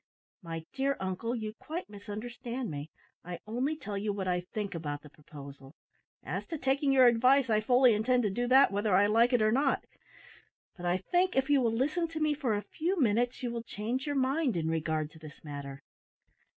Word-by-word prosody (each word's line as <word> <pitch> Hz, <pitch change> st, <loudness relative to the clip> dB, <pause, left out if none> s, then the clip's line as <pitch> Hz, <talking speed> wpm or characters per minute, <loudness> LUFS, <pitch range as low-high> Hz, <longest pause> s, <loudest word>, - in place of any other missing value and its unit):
"My 165 Hz, -2 st, -6 dB
dear 270 Hz, +1 st, 0 dB
uncle, 190 Hz, +6 st, -2 dB
you 215 Hz, -2 st, -4 dB
quite 320 Hz, +9 st, -6 dB
misunderstand 230 Hz, +3 st, -6 dB
me. 145 Hz, +1 st, -6 dB, 0.3 s
I 175 Hz, 0 st, -6 dB
only 255 Hz, +8 st, -1 dB
tell 205 Hz, -8 st, -5 dB
you 210 Hz, +1 st, -1 dB
what 195 Hz, -2 st, -3 dB
I 180 Hz, -1 st, +1 dB
think 200 Hz, +3 st, -5 dB
about 145 Hz, -3 st, -4 dB
the 150 Hz, -, -13 dB
proposal. 140 Hz, -1 st, -12 dB, 0.5 s
As -, -, -3 dB
to 325 Hz, -, -4 dB
taking 275 Hz, +1 st, +1 dB
your 260 Hz, -1 st, +6 dB
advice, 250 Hz, +2 st, +4 dB
I 215 Hz, 0 st, +3 dB
fully 250 Hz, +2 st, +5 dB
intend 245 Hz, +4 st, +2 dB
to 205 Hz, -, 0 dB
do 245 Hz, +5 st, -1 dB
that 265 Hz, -1 st, +6 dB
whether 205 Hz, -1 st, +1 dB
I 200 Hz, +2 st, +5 dB
like 230 Hz, +4 st, +4 dB
it 245 Hz, -3 st, +3 dB
or 215 Hz, -, +3 dB
not; 270 Hz, +3 st, +1 dB, 0.9 s
but 175 Hz, -1 st, -5 dB
I 175 Hz, +1 st, +2 dB
think, 355 Hz, -, +1 dB
if 265 Hz, +2 st, +1 dB
you 280 Hz, -2 st, +5 dB
will 230 Hz, -2 st, +2 dB
listen 305 Hz, +7 st, 0 dB
to 325 Hz, -1 st, -6 dB
me 305 Hz, -1 st, +2 dB
for 270 Hz, -7 st, -1 dB
a 205 Hz, -, -3 dB
few 355 Hz, +4 st, -2 dB
minutes, 245 Hz, +1 st, +1 dB
you 245 Hz, -, -1 dB
will 235 Hz, -1 st, -3 dB
change 235 Hz, +5 st, -4 dB
your 290 Hz, -, -1 dB
mind 265 Hz, -, +1 dB
in 160 Hz, -1 st, -1 dB
regard 155 Hz, -1 st, -1 dB
to 160 Hz, -, -15 dB
this 155 Hz, -2 st, -13 dB
matter. 140 Hz, -2 st, -7 dB
230 Hz, 205 wpm, -30 LUFS, 185-265 Hz, 0.9 s, your